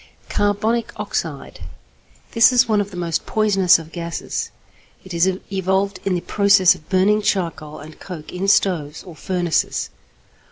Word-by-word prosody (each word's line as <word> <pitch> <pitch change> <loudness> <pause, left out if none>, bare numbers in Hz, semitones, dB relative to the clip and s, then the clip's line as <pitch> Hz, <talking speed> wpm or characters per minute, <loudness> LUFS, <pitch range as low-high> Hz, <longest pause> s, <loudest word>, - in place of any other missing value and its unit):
=Carbonic 215 +3 0
Oxide.= - - -4 0.7
This 230 +1 +5
is 245 -1 +4
one 215 -2 +2
of 200 - -5
the 185 - -10
most 170 -2 -2
poisonous 195 -4 +3
of 165 -1 -11
gases. 170 -1 -4 0.6
It 190 - -9
is 170 +2 +2 0.3
evolved 190 +1 0
in 190 -2 0
the 175 - -2
process 200 -2 +4
of 155 - -16
burning 200 +3 +3
charcoal 165 -7 -2
and 155 +2 -12
coke 170 -5 -9
in 185 +2 -3
stoves 165 -7 +1
or 175 -4 -12
furnaces. 175 -1 -1
190 Hz, 150 wpm, -20 LUFS, 170-205 Hz, 0.7 s, This